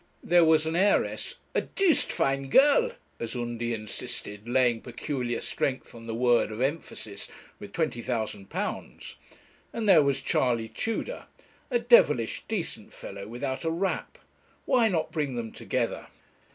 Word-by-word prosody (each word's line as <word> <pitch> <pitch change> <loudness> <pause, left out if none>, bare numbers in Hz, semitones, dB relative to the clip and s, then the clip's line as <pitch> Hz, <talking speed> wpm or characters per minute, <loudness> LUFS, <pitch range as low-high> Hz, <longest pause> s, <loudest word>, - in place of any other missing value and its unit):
There 175 0 +5
was 160 -1 +4
an 160 +1 -1
heiress, 200 +3 +2 0.2
a - - +2
'doosed 385 -5 +2
fine 135 0 0
girl' 295 - +5 0.3
as 115 0 -4
Undy 120 -1 -3
insisted, 105 0 -5
laying 120 -2 +3
peculiar 125 0 -3
strength 130 -2 -2
on 115 -1 -11
the 115 - -3
word 120 -2 +3
of 110 - -6
emphasis, 130 -7 -3 0.3
with 100 - -9
£20,000, 115 - -3 0.6
and 225 -2 -3
there 180 -6 +8
was 140 -1 +1
Charley 115 -3 +1
Tudor, 225 - -3 0.4
a 245 - +2
devilish 225 - +4
decent - - -3
fellow, 100 0 -8
without 130 +3 -4
a 165 - 0
rap. 180 +4 -2 0.5
Why 250 -4 +4
not 165 -5 -1
bring 145 -5 -2
them 115 -2 -4
together? - - -2
130 Hz, 140 wpm, -28 LUFS, 115-165 Hz, 0.6 s, there